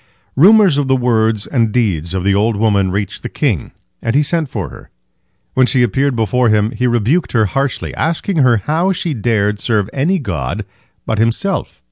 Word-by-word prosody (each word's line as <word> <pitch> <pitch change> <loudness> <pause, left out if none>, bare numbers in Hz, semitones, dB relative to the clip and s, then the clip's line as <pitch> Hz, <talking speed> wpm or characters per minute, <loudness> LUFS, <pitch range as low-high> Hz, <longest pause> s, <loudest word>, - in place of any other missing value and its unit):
Rumors 190 0 +5
of 140 - -1
the 130 - +3
words 110 -4 +1
and 115 -5 0
deeds 95 -7 -1
of 95 - -2
the 100 0 +2
old 105 +3 +1
woman 100 -3 +1
reached 100 +1 -3
the - - -5
king, - - -1 0.3
and 115 +2 -1
he 150 - +4
sent 160 -1 -1
for 100 -9 -4
her. - - -13 0.6
When 130 -1 +3
she 125 -2 +2
appeared 135 +4 0
before 120 +2 +1
him, 105 +1 +2
he 125 +1 -1
rebuked 120 - 0
her 110 -3 +3
harshly, 135 +6 -2
asking 165 +3 -2
her 125 -5 +4
how 160 - 0
she 170 -2 -3
dared 105 -4 0
serve 105 -2 -1
any 160 +8 +1
god 90 - -4 0.4
but 110 - -2
himself. 115 - -1
120 Hz, 185 wpm, -16 LUFS, 105-140 Hz, 0.6 s, Rumors